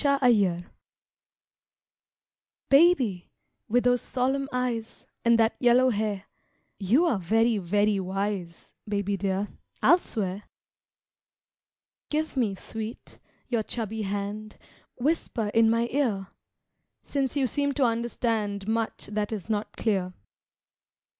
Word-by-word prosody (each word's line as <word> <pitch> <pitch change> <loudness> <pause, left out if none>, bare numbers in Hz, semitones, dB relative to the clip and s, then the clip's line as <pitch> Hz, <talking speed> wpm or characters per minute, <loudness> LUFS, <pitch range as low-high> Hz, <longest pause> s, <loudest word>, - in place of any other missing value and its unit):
TO 280 -1 +4
A 245 - +7
BABY 180 -6 +2 2.0
Baby, 275 - +4 0.4
with 245 +3 +3
those 245 0 +3
solemn 270 +2 -1
eyes 245 -3 -3 0.2
And 235 0 +5
that 225 0 +3
yellow 250 +1 +5
hair 205 -2 -2 0.5
You 230 - +3
are 250 - +1
very, 225 +4 +2
very 205 +3 +1
wise, 190 -2 -4 0.2
Baby 200 -1 0
dear, 195 +1 -1 0.3
I'll 350 - +7
swear! 200 - -4 1.6
Give 310 0 -1
me, 225 -7 +1
sweet, 220 +3 -8 0.3
your 235 -3 0
chubby 220 0 -4
hand, 205 +1 -4 0.4
Whisper 250 -5 -1
in 225 +1 +4
my 230 +1 +2
ear, 220 -9 0 0.7
Since 275 -2 -2
you 275 -2 +2
seem 285 +3 0
to 275 - +1
understand 225 -4 -1
Much 225 0 -1
that 210 0 -2
is 215 0 -4
not 210 0 -3
clear. 190 -5 0
220 Hz, 115 wpm, -27 LUFS, 200-245 Hz, 2.0 s, A